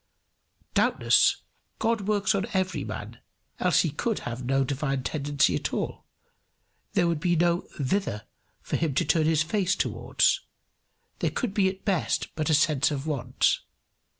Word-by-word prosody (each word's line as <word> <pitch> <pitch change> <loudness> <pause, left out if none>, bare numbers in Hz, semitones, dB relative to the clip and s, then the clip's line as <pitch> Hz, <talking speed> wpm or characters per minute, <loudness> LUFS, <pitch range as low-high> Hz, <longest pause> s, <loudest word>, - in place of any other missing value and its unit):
Doubtless, - - +3 0.3
God 225 -3 0
works 205 -2 +2
on 195 -1 -1
every 185 -1 0
man, - - -7 0.4
else - - +3
he 165 - -1
could 215 +9 -1
have 120 +1 -5
no 135 +2 +2
divine 135 0 -2
tendency 140 - +1
at 75 - -2
all; - - -4 0.9
there 175 - +3
would 165 -3 0
be 175 +2 +1
no 170 +1 +1
thither 135 - -1 0.4
for - - -1
him 155 -5 -1
to - - +2
turn 155 +1 +2
his 160 -1 +3
face 190 +2 0
towards; - - +1 0.8
there - - +1
could 245 -7 -3
be 195 -2 +3
at 190 0 -9
best 175 - 0
but 155 0 -2
a 155 - +5
sense 150 -1 +3
of 145 -1 -4
want. 130 -5 +1
160 Hz, 155 wpm, -27 LUFS, 135-190 Hz, 0.9 s, a